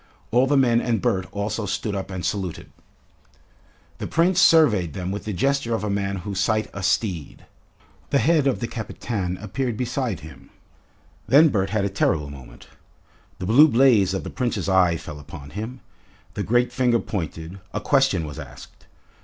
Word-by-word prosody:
All 125 Hz, +3 st, +4 dB
the 145 Hz, +1 st, +3 dB
men 120 Hz, -3 st, +3 dB
and 115 Hz, -3 st, 0 dB
Bert 95 Hz, 0 st, 0 dB
also 105 Hz, +1 st, -3 dB
stood 105 Hz, +2 st, -2 dB
up 95 Hz, 0 st, -4 dB
and 95 Hz, -2 st, -5 dB
saluted. 95 Hz, -6 st, -4 dB, 1.3 s
The -, -, -4 dB
Prince 175 Hz, +2 st, +2 dB
surveyed 105 Hz, -, +4 dB
them 90 Hz, 0 st, -4 dB
with 100 Hz, -, -5 dB
the 110 Hz, -, -3 dB
gesture 125 Hz, +4 st, 0 dB
of 110 Hz, -, -4 dB
a 105 Hz, -, -1 dB
man 100 Hz, -1 st, -1 dB
who 100 Hz, -, -4 dB
site 110 Hz, +3 st, 0 dB
a 100 Hz, -, -6 dB
steed. 95 Hz, -4 st, -1 dB, 0.6 s
The -, -, +2 dB
head 150 Hz, +2 st, +3 dB
of 135 Hz, -, 0 dB
the 120 Hz, -, -1 dB
Kapitan 105 Hz, -5 st, -4 dB
appeared 110 Hz, +4 st, -3 dB
beside 125 Hz, -, -2 dB
him. 80 Hz, -3 st, -13 dB, 0.8 s
Then 145 Hz, +8 st, +6 dB
Bert 95 Hz, -6 st, 0 dB
had 100 Hz, -1 st, 0 dB
a -, -, +2 dB
terrible 75 Hz, -7 st, 0 dB
moment. 65 Hz, -3 st, -13 dB, 0.7 s
The 90 Hz, -, -5 dB
blue 130 Hz, +10 st, +7 dB
blaze 115 Hz, -8 st, +4 dB
of 95 Hz, -, -3 dB
the -, -, -6 dB
Prince's 120 Hz, -7 st, -2 dB
eye 90 Hz, -3 st, +3 dB
fell 75 Hz, -2 st, -9 dB
upon 70 Hz, -1 st, -11 dB
him, 110 Hz, -, -6 dB, 0.5 s
the -, -, -3 dB
great 120 Hz, +3 st, +1 dB
finger 125 Hz, -2 st, +2 dB
pointed, 85 Hz, -3 st, -5 dB
a -, -, -2 dB
question 135 Hz, -, +2 dB
was 75 Hz, -1 st, -8 dB
asked. -, -, -12 dB
105 Hz, 175 wpm, -23 LUFS, 95-125 Hz, 1.3 s, blue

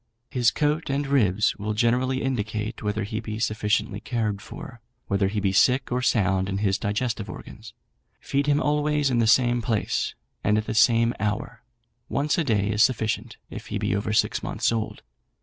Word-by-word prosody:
His 120 Hz, -3 st, +3 dB
coat 150 Hz, +1 st, 0 dB
and 140 Hz, +1 st, 0 dB
ribs 110 Hz, -8 st, +2 dB
will 105 Hz, +1 st, -3 dB
generally 125 Hz, +4 st, +1 dB
indicate 110 Hz, -3 st, -2 dB
whether 105 Hz, +1 st, -1 dB
he 110 Hz, +2 st, -3 dB
be 110 Hz, -1 st, -5 dB
sufficiently 105 Hz, -1 st, 0 dB
cared 110 Hz, -4 st, -2 dB
for, 120 Hz, +3 st, -10 dB, 0.3 s
whether 100 Hz, 0 st, +1 dB
he 105 Hz, +2 st, -2 dB
be 100 Hz, -1 st, +1 dB
sick 125 Hz, +7 st, +3 dB
or 125 Hz, +1 st, 0 dB
sound 95 Hz, -6 st, +1 dB
in 95 Hz, -, -2 dB
his 100 Hz, -1 st, +1 dB
digestive 110 Hz, 0 st, -2 dB
organs; -, -, -10 dB, 0.5 s
feed 140 Hz, +1 st, -1 dB
him 145 Hz, 0 st, +3 dB
always 150 Hz, -2 st, +1 dB
in 120 Hz, -, +2 dB
the 115 Hz, -, +3 dB
same 120 Hz, +1 st, +4 dB
place, 110 Hz, -2 st, -1 dB, 0.3 s
and 105 Hz, -, +3 dB
at 110 Hz, -, -1 dB
the 110 Hz, -, -3 dB
same 115 Hz, +1 st, +4 dB
hour: 105 Hz, +1 st, -3 dB, 0.5 s
once 145 Hz, +2 st, +1 dB
a -, -, +2 dB
day 105 Hz, -6 st, +1 dB
is 105 Hz, 0 st, +1 dB
sufficient, 110 Hz, -2 st, 0 dB
if -, -, -8 dB
he -, -, -3 dB
be 95 Hz, -, 0 dB
over 100 Hz, +1 st, -2 dB
six 110 Hz, -, +1 dB
months -, -, 0 dB
old. 115 Hz, -1 st, -3 dB
110 Hz, 185 wpm, -25 LUFS, 105-130 Hz, 0.5 s, same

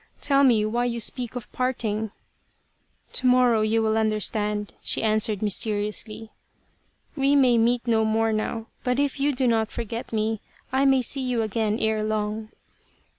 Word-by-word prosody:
Tell 280 Hz, -1 st, +3 dB
me 230 Hz, -5 st, +4 dB
why 240 Hz, +3 st, 0 dB
you 235 Hz, -1 st, -2 dB
speak 245 Hz, +2 st, -2 dB
of 245 Hz, -, -7 dB
parting? 220 Hz, -4 st, -2 dB, 0.4 s
" -, -, -44 dB
" -, -, -38 dB
To 255 Hz, -, 0 dB
morrow 250 Hz, -3 st, +4 dB
you 220 Hz, +1 st, +1 dB
will 220 Hz, 0 st, +1 dB
understand," 210 Hz, -1 st, -1 dB
she -, -, -1 dB
answered 215 Hz, -1 st, +1 dB
mysteriously. 210 Hz, +1 st, -2 dB, 0.4 s
" -, -, -40 dB
We 275 Hz, 0 st, +2 dB
may 250 Hz, -4 st, +4 dB
meet 240 Hz, +1 st, +2 dB
no 225 Hz, -2 st, +2 dB
more 220 Hz, 0 st, +1 dB
now, 220 Hz, +1 st, -2 dB, 0.2 s
but 250 Hz, -1 st, 0 dB
if 285 Hz, 0 st, 0 dB
you 285 Hz, +1 st, +2 dB
do 260 Hz, -1 st, -1 dB
not 225 Hz, -2 st, +1 dB
forget 230 Hz, 0 st, -5 dB
me 220 Hz, -1 st, -1 dB, 0.3 s
I 270 Hz, +1 st, +3 dB
may 265 Hz, -2 st, +4 dB
see 270 Hz, +3 st, -1 dB
you 250 Hz, -3 st, 0 dB
again 215 Hz, 0 st, -1 dB
ere 220 Hz, -1 st, 0 dB
long." 215 Hz, 0 st, -2 dB
225 Hz, 175 wpm, -25 LUFS, 215-250 Hz, 0.4 s, me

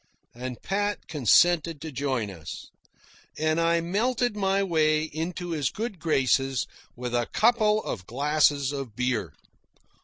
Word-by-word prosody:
And 125 Hz, 0 st, -6 dB
Pat 205 Hz, +1 st, -2 dB
consented 160 Hz, -, +3 dB
to 160 Hz, -1 st, -6 dB
join 130 Hz, -6 st, -2 dB
us, 80 Hz, -7 st, -9 dB, 0.7 s
and 155 Hz, +1 st, +1 dB
I 170 Hz, 0 st, +2 dB
melted 225 Hz, +6 st, 0 dB
my 195 Hz, -1 st, +1 dB
way 155 Hz, -4 st, +2 dB
into 165 Hz, +3 st, -4 dB
his 150 Hz, -5 st, 0 dB
good 215 Hz, -4 st, -5 dB
graces 135 Hz, -4 st, +1 dB, 0.3 s
with 125 Hz, 0 st, -5 dB
a 120 Hz, -1 st, +1 dB
couple 215 Hz, -2 st, +3 dB
of 90 Hz, -, -5 dB
glasses 145 Hz, +1 st, +2 dB
of 135 Hz, -6 st, -6 dB
beer. 125 Hz, -, -1 dB
155 Hz, 130 wpm, -26 LUFS, 130-180 Hz, 0.7 s, consented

